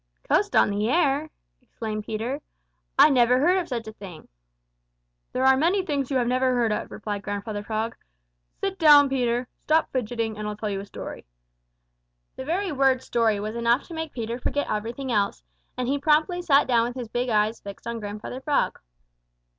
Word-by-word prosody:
"Coast - - +2
on - - +5
the 205 +2 0
air!" 300 0 +2 0.3
exclaimed 215 -4 -6
Peter. 235 +7 -3 0.6
"I 290 +3 +8
never 250 -1 +4
heard 355 +7 +3
of 355 - -4
such 235 -4 -4
a 220 - -7
thing." 185 -7 -11 1.0
"There 260 +1 0
are 265 0 +7
many 355 +7 +2
things 280 -6 -1
you 270 - +1
never 255 +2 +1
have 255 - +2
heard 235 -2 +2
of," 210 - -2
replied 205 -1 -5
Grandfather 205 +1 -4
Frog. 220 +2 -3 0.6
"Sit 390 -1 -3
down, 295 -3 +7
Peter, 245 -3 +1
and 245 0 -5
stop 315 +1 +2
fidgeting, 230 -3 -2
and 210 - -3
I'll 210 0 -4
tell 210 -1 -3
you 195 - -2
a 200 - -8
story." - - -8 1.1
The 260 - -7
very 365 +5 -1
word 265 -2 +2
story 225 -3 +1
was 215 +2 -4
enough 235 +3 +2
to - - -7
make 320 -1 -4
Peter 235 0 -4
forget 285 +3 -1
everything 230 +5 -3
else, 200 - 0 0.3
and 250 -1 -2
he 280 +2 0
promptly 310 +5 +2
sat 290 -5 +4
down 235 -2 +2
with 245 - -6
his 250 -3 -5
big 245 +3 -2
eyes 215 0 +1
fixed 200 -1 -10
on 235 0 -4
Grandfather 210 +4 -6
Frog. 290 0 0
245 Hz, 190 wpm, -25 LUFS, 215-285 Hz, 1.1 s, I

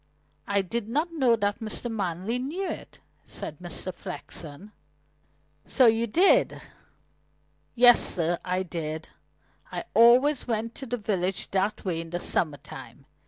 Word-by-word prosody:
I 200 -1 +1
did 225 +3 -4
not 310 +7 -1
know 260 -7 +3
that 205 0 -1
Mr. 220 +1 -4
Manley 200 +1 -2
knew 330 +10 -3
it," - - -7 0.3
said - - -8
Mr. - - -4
Flexen. 170 +6 -8 1.0
"So 260 - +4
you 225 0 +4
did?" 380 - +4 1.2
"Yes, 245 0 +7
sir, 170 0 +1
I 185 +1 -1
did. 160 -3 -5 0.6
I - - -3
always 250 +5 +5
went 230 0 -2
to 270 - -7
the 245 +1 -2
village 195 -4 -2
that 195 +3 -1
way 170 -3 -1
in 165 - -9
the 175 +1 -3
summer 155 -4 +1
time. 135 0 -11
215 Hz, 140 wpm, -27 LUFS, 175-245 Hz, 1.2 s, Yes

